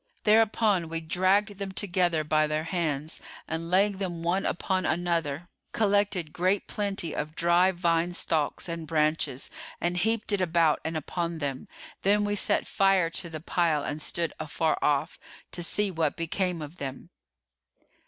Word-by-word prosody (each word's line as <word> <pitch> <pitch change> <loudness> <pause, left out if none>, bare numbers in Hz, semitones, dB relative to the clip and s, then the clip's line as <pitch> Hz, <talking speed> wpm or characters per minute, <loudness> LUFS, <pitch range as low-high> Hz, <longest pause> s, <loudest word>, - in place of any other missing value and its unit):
Thereupon 210 -5 +3
we 165 0 -2
dragged 190 +5 +1
them 195 -1 -4
together 175 -4 +1
by 155 0 +2
their 155 +1 -1
hands 160 -3 -2 0.3
and 160 +1 -4
laying 195 +2 +3
them 175 -4 -4
one 180 +3 +1
upon 185 +2 -1
another, 170 -2 -1 0.3
collected 200 -6 +1
great 185 +3 +1
plenty 200 -6 -2
of 155 +1 -4
dry 175 +2 +4
vine 175 -1 +1
stalks 160 +2 0
and 165 -2 -5
branches 150 -4 0 0.3
and 175 +1 -1
heaped 220 +3 0
it 200 -2 +1
about 165 -3 +3
and 160 0 -2
upon 170 +2 -3
them: 140 -4 -4 0.3
then 205 +1 +3
we 205 - 0
set - - +2
fire 195 -4 +3
to 170 0 -4
the 160 -1 -6
pile 165 -3 +1
and 150 +1 -4
stood 170 +1 -1
afar 155 +1 0
off, 145 -2 +1 0.3
to 175 - -4
see 200 +4 0
what 160 -4 -1
became 170 0 -1
of 150 +4 -9
them." 135 -3 -7
170 Hz, 155 wpm, -28 LUFS, 160-190 Hz, 0.3 s, dry